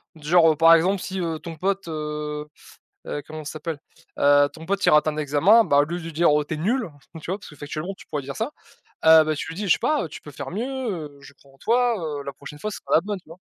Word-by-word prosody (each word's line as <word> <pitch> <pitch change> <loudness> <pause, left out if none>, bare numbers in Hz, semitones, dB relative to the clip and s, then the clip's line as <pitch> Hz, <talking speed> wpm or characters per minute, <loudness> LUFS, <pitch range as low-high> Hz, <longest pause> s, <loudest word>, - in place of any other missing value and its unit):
Du 150 -2 -12
genre, 165 -1 +6
heu, - - -1
par 165 +1 +7
exemple, 185 +3 +1
si, 190 0 -4
heu, 165 -2 -2
ton 170 -2 -8
pote, 195 +3 -2
heu 150 -1 -4 0.6
heu, 145 - -4
comment 155 0 -8
ça 150 - -6
s'appelle, 155 0 -5 0.4
heu, 145 0 +5
ton 160 0 -11
pote 200 +2 -1
il - - +6
rate 150 0 +5
à - - +3
un 150 - -8
examen, 155 +10 +4
bah, 145 -5 +3
au 145 - +5
lieu 170 +4 -4
de - - -9
lui 165 - -6
dire: 165 +2 +3
«Oh, 150 0 +2
tu 145 - -8
es - - -4
nul!» 230 +10 0
enfin, 145 +1 -14
tu 160 - -7
vois, 190 - -2
parce 210 - -12
que 150 - -14
factuellement 155 +7 -5
tu - - -15
pourrais 150 - -3
dire 135 +1 -7
ça, 225 +5 -2 0.6
heu, 160 0 +8
bah 155 0 0
tu - - -5
lui - - -8
dis: 200 +2 -4
«Je 175 - +6
sais - - -2
pas, 300 - 0
tu 150 - -10
peux 150 - -11
faire 140 0 -7
mieux, 205 +6 -2
heu, 200 - -4
je 140 - -14
crois 140 -1 -23
en - - -22
toi, 240 - +2 0.2
heu, - - -9
la 140 - -5
prochaine 145 +1 -11
fois 215 - -3
sera - - -9
la 160 - +5
bonne», 205 +1 -4
tu - - -36
vois? 165 - -12
160 Hz, 300 wpm, -24 LUFS, 150-190 Hz, 0.6 s, heu